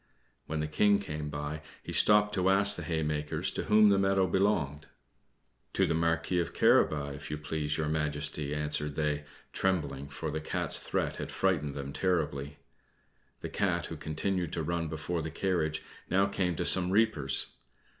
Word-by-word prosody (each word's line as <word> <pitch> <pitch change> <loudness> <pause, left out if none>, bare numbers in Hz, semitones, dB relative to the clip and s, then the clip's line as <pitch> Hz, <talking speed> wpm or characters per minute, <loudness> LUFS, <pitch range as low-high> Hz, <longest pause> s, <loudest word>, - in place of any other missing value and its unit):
When 80 0 -2
the 75 - -2
King 100 +7 +3
came 75 -7 -5
by, 75 +1 -5 0.2
he - - -7
stopped 105 0 +4
to 95 -1 +1
ask 100 +1 +7
the - - -5
haymakers 75 -2 -1
to - - -4
whom 105 0 +5
the 100 -1 +3
meadow 95 -1 +2
belonged. 85 -6 0 0.9
"To - - +2
the - - 0
Marquis 85 +2 0
of 85 - -3
Carabas, 70 -2 +2
if - - -10
it 75 0 -5
please 75 0 -2
Your 80 -1 -1
Majesty," 75 -1 -2
answered 75 -1 -2
they, 75 -1 -1 0.3
trembling, 70 -7 -1
for 75 +1 -5
the 80 +1 -3
Cat's - - +1
threat - - -2
had - - -5
frightened 75 -7 0
them 70 0 -6
terribly. 75 -6 -1 0.8
The - - -5
Cat, 90 -4 -1
who 80 - -7
continued 80 +3 -2
to 80 - -2
run 85 +1 -2
before 80 +2 -3
the 80 - -4
carriage, 80 -2 -1 0.3
now 95 +2 +3
came 95 -3 -1
to 85 - -2
some 90 0 +6
reapers. 95 -10 +1
80 Hz, 170 wpm, -30 LUFS, 75-95 Hz, 0.9 s, ask